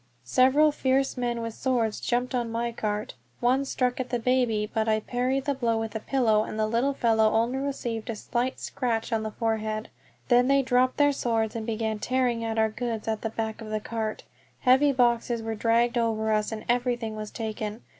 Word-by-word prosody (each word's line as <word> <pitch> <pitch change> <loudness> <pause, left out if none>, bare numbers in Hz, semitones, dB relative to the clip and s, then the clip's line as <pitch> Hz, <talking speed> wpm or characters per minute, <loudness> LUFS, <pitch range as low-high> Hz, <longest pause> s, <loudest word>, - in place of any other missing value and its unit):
Several 265 - +4
fierce 270 -1 +1
men 240 -2 -2
with 230 -1 -4
swords 235 -4 0
jumped 245 +2 -1
on 240 -2 -1
my 235 +1 -1
cart. 210 -2 -3 0.3
One 255 +3 +2
struck 250 -2 -1
at 255 -1 -3
the 245 - 0
baby, 235 -3 +1
but 220 -1 0
I 215 0 +3
parried 255 +4 -1
the 285 - +1
blow 235 -4 0
with 225 -1 -4
a - - -1
pillow, 220 -3 +2
and 215 - -6
the 215 - +2
little 235 +6 0
fellow 220 -3 +3
only 235 +4 +1
received 240 -5 -3
a 230 - -2
slight 245 +4 -2
scratch 235 -3 -2
on 220 - +1
the 220 - -3
forehead. 220 -1 -2 0.4
Then 245 0 +4
they 275 0 +4
dropped 255 0 +2
their 290 -1 +4
swords 225 -4 -1
and 225 0 -4
began 220 -1 -2
tearing 245 -1 0
at 225 0 -2
our 220 0 +3
goods 225 0 -4
at 220 -1 -1
the 225 - -2
back 220 0 -4
of 220 - -7
the 215 0 -1
cart. 220 0 -4 0.4
Heavy 265 +3 +5
boxes 240 -2 +1
were 225 0 -2
dragged 235 +2 +2
over 220 -1 0
us, 215 0 0
and 220 -1 -6
everything 240 -2 0
was 215 -1 -5
taken. 220 0 -5
230 Hz, 205 wpm, -27 LUFS, 220-250 Hz, 0.4 s, Heavy